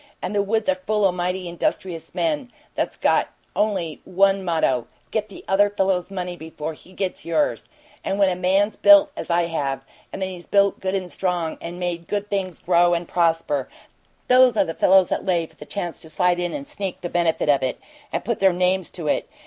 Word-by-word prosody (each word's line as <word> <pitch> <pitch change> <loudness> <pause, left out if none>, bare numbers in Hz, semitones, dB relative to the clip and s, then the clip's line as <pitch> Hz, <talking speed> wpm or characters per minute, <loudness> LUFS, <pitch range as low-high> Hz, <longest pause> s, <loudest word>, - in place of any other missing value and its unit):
And - - -4
the 205 - +2
woods 215 +2 0
are 190 - +4
full 210 -1 +2
o' 190 - +4
mighty 180 +1 -2
industrious 170 0 -3
men 295 -6 -1 0.2
that's - - -2
got - - +2 0.3
only 185 -8 -1
one 195 +1 +2
motto: 160 -8 +1 0.2
'Get 215 -1 -1
the 200 - -12
other 205 +1 +4
fellow's 190 -3 0
money 180 -2 -4
before 160 -1 -6
he 175 - -18
gets 185 0 -3
yours!' 280 - 0 0.3
And 195 - -1
when 200 -1 +4
a 185 - +1
man's 190 +4 +2
built 300 -1 +7
as - - -6
I 170 0 +3
have, 140 -5 -2 0.2
when 195 - -7
he's 185 -2 -6
built 200 -1 +3
good 190 0 -2
and 185 -2 -3
strong, 175 -4 -1
and 170 +1 -6
made 175 -2 -3
good 205 0 -3
things 190 -3 -2
grow 175 0 +3
and 170 0 -3
prosper 165 -5 +1 0.6
THOSE 250 -2 +6
are - - +4
the 165 - -4
fellows 190 +1 +5
that - - -1
lay 175 -3 +1
for - - -20
the - - -11
chance 175 -4 -4
to 160 - -9
slide 175 +2 +1
in 175 -1 -1
and 280 -1 -6
sneak 200 -11 -5
the 175 - -3
benefit 170 -3 0
of 140 -2 +4
it 130 - -2 0.3
and - - -3
put 235 - -1
their 190 -2 +4
names 180 0 +1
to 165 -4 -6
it! - - 0
180 Hz, 210 wpm, -23 LUFS, 170-200 Hz, 0.6 s, built